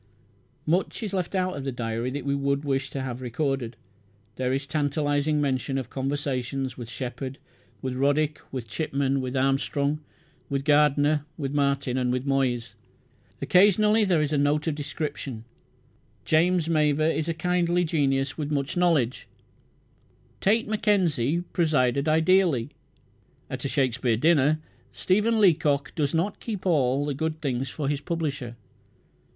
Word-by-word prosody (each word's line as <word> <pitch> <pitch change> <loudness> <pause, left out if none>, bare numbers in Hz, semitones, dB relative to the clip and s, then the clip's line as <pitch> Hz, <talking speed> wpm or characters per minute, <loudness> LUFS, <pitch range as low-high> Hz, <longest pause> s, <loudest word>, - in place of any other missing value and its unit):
Much 180 +7 0
is 205 -3 -4
left 185 0 -2
out 185 -1 0
of 140 - -5
the 135 - -2
diary 115 0 -3
that 140 +1 -5
we 140 - +1
would 140 +1 0
wish 135 -1 -1
to 135 - -4
have 125 -1 -5
recorded. 125 -1 -2 0.6
There 130 -1 -1
is 135 +1 -1
tantalizing 145 0 0
mention 135 -1 -1
of 130 -4 -5
"conversations" 135 -2 -2
with 120 -2 -8
Shepherd 125 +4 -5 0.5
with 130 -1 -2
Roddick 145 +3 +1
with 125 -4 -5
Chipman 135 +2 -1
with 130 +1 -3
Armstrong 140 +2 +1 0.5
with 140 -1 -2
Gardner 150 0 +3
with 140 -3 -3
Martin 135 -3 0
with 125 +1 -1
Moyse. 130 -4 0 0.7
Occasionally 210 +3 +5
there 175 -6 +2
is 150 +1 -2
a 145 - +2
note 145 +1 +1
of 160 - 0
description: 145 -5 -5 0.8
"James 170 +1 +3
Mavor 155 -2 +2
is 160 0 0
a - - +1
kindly 175 0 +1
genius 140 -3 0
with 150 -1 -2
much 140 +1 -1
knowledge"; 165 -9 +1 1.1
"Tait 220 +4 +2
McKenzie 175 - +1
presided 140 -3 +2
ideally" 160 -5 +3 0.8
at - - -4
a - - -1
Shakespeare 130 -4 +1
dinner; 155 +1 +3 0.3
"Stephen 210 +4 +1
Leacock 150 -7 +3
does 145 0 -1
not 180 +6 -1
keep 210 -5 -5
all 140 -5 +2
the 145 - -1
good 155 +3 -3
things 135 -3 -2
for 145 +1 -4
his 145 0 -1
publisher." 145 -7 -3
145 Hz, 145 wpm, -26 LUFS, 135-160 Hz, 1.1 s, Occasionally